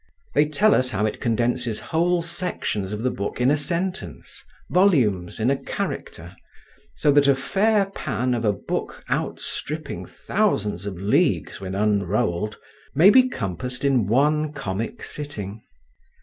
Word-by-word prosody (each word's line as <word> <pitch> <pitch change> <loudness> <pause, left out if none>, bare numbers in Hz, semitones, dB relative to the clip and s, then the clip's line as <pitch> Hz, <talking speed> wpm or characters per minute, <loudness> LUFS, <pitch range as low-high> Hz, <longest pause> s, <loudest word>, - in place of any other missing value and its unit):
They 150 +1 +4
tell 205 +9 +3
us 130 0 +3
how 105 -4 0
it 110 - -2
condenses 120 -1 0
whole 170 +1 +1
sections 170 - -2
of 105 +2 -4
the 130 - +1
book 100 +4 -4
in 125 +2 +4
a - - +4
sentence, 170 - -3 0.3
volumes 125 - +2
in 115 +4 +2
a - - +3
character; - - -5 0.6
so 150 - +3
that 145 0 +5
a 140 - +5
fair 205 +8 +2
pan 125 -9 -1
of 120 -1 -1
a 105 - +3
book 100 - -4
outstripping 155 -1 -3
thousands 105 - -1
of 100 - -4
leagues 135 - +1
when 95 0 -5
unrolled 105 0 0 0.4
may 175 +8 +7
be 255 +1 +6
compassed 125 - -4
in 130 -7 +3
one 150 +6 +2
comic 100 -3 -4
sitting. 110 -8 -5
125 Hz, 145 wpm, -23 LUFS, 105-155 Hz, 0.6 s, may